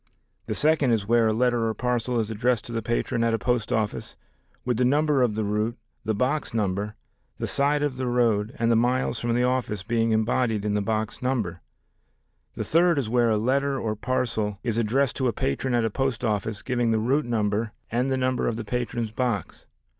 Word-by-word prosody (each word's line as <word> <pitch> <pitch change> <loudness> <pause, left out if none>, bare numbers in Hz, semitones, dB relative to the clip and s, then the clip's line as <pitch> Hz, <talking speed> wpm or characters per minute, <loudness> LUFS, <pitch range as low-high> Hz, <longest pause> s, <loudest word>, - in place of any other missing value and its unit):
The - - -2
second 150 -3 +3
is 110 -4 +1
where 115 0 +4
a - - +3
letter 120 0 +1
or 110 - -2
parcel 125 +1 0
is 110 0 -2
addressed 120 +1 0
to - - -8
the 115 -1 -2
patron 115 0 -1
at 115 -1 +2
a - - 0
post 120 -1 -1
office, 105 - -2 0.5
with 125 -2 0
the 125 - +2
number 145 +2 +3
of 120 -4 +2
the 110 - -1
route, 105 +3 -1 0.3
the 110 - 0
box 130 +3 -1
number, 105 0 -1 0.4
the - - -3
side 145 +1 +1
of 140 -3 -1
the 130 -1 -2
road, 115 -1 +1
and 115 0 +2
the - - +4
miles 125 +1 +1
from 120 0 0
the 125 - +2
office 125 -6 -1
being 115 +1 +1
embodied 110 -1 +1
in 105 - 0
the 105 - +1
box 110 0 -2
number. 115 -9 -1 0.9
The - - -3
third 170 0 +3
is 130 -6 -1
where 120 -1 +3
a 110 - +2
letter 135 +4 +1
or 110 -3 -2
parcel 110 -3 -1
is 115 -2 0
addressed 125 +4 +1
to 130 - +1
a 120 - 0
patron 120 - -1
at 120 -1 +2
a 110 - -1
post 135 -1 -1
office 105 -1 -1
giving 120 -1 0
the 110 - +2
route 130 +7 +1
number 110 -1 0 0.2
and 125 +3 +1
the 130 - +1
number 130 -1 0
of 115 - 0
the 115 -1 -5
patron's 120 -1 -2
box. 115 -5 -3
115 Hz, 215 wpm, -25 LUFS, 110-125 Hz, 0.9 s, where